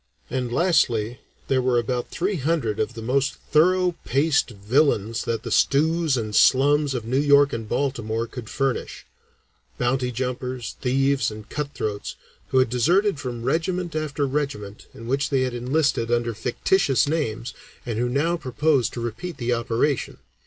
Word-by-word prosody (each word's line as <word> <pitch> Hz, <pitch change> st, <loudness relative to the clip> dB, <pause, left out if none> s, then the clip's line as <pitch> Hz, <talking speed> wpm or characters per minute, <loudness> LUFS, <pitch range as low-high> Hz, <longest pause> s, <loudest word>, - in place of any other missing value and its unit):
And, 125 Hz, -1 st, -2 dB
lastly, 125 Hz, -, +1 dB, 0.3 s
there 130 Hz, -1 st, +2 dB
were 125 Hz, -1 st, +2 dB
about 120 Hz, +1 st, -1 dB
three 190 Hz, +2 st, -1 dB
hundred 140 Hz, -7 st, -1 dB
of 110 Hz, -, -1 dB
the 115 Hz, -, -7 dB
most 135 Hz, +3 st, +1 dB, 0.2 s
thorough 180 Hz, +4 st, +4 dB
paced 145 Hz, +3 st, +2 dB
villains 115 Hz, 0 st, +1 dB
that 115 Hz, -1 st, -2 dB
the 115 Hz, -, -5 dB
stews 160 Hz, +2 st, +2 dB
and 110 Hz, -3 st, -3 dB
slums 145 Hz, +3 st, +4 dB
of 120 Hz, -3 st, -4 dB
New 130 Hz, +4 st, +1 dB
York 145 Hz, -1 st, +5 dB
and 115 Hz, -2 st, -5 dB
Baltimore 115 Hz, -5 st, -1 dB
could 120 Hz, -1 st, -9 dB
furnish 135 Hz, -2 st, -2 dB, 0.7 s
bounty 125 Hz, 0 st, 0 dB
jumpers, 125 Hz, -1 st, -4 dB
thieves, 135 Hz, +2 st, +1 dB
and 105 Hz, -1 st, -10 dB
cut 145 Hz, -1 st, -4 dB
throats, 105 Hz, -3 st, -4 dB, 0.3 s
who 130 Hz, -, 0 dB
had 130 Hz, -3 st, +3 dB
deserted 175 Hz, -, +2 dB
from 120 Hz, -3 st, -5 dB
regiment 170 Hz, +5 st, -1 dB
after 150 Hz, -2 st, -1 dB
regiment 130 Hz, -8 st, -4 dB
in 115 Hz, -, -11 dB
which 135 Hz, +4 st, 0 dB
they 135 Hz, -2 st, +1 dB
had 130 Hz, -1 st, -1 dB
enlisted 125 Hz, -1 st, 0 dB
under 120 Hz, -1 st, +1 dB
fictitious 130 Hz, -, +1 dB
names 125 Hz, -6 st, -2 dB, 0.3 s
and 115 Hz, -3 st, -3 dB
who 125 Hz, 0 st, 0 dB
now 150 Hz, +7 st, +1 dB
proposed 140 Hz, -1 st, +1 dB
to 120 Hz, -, -5 dB
repeat 135 Hz, +10 st, -5 dB
the 120 Hz, 0 st, 0 dB
operation. 120 Hz, +4 st, -1 dB
130 Hz, 160 wpm, -24 LUFS, 115-145 Hz, 0.7 s, York